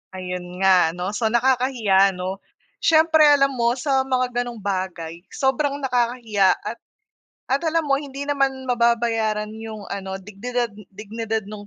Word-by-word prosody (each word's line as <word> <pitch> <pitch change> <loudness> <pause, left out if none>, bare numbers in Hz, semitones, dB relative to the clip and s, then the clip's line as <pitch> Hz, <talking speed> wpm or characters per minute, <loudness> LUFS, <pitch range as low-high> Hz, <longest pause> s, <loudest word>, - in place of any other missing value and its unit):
Ayun 180 0 -5
nga 180 -3 +4
'no. 180 +2 -3
So 220 +2 0
nakakahiya 235 -5 +2
'no, 185 +2 -4 0.4
siyempre 315 -1 +5
alam 280 -1 +5
mo 240 -2 +1
sa 265 0 0
mga 250 -2 0
ganong 240 -3 -8
bagay 185 -4 -3
sobrang 280 +1 0
nakakahiya 235 -6 +2
at - - -5 0.7
at 275 +5 0
alam 330 0 +2
mo 275 -2 +1
hindi 280 -1 -7
naman 275 -2 0
mababayaran 230 -3 +1
'yong 220 -1 -8
ano 195 -1 -4
dignidad 240 +5 -3 0.3
dignidad 220 +2 -3
nung 210 -1 -9
235 Hz, 140 wpm, -22 LUFS, 200-265 Hz, 0.7 s, siyempre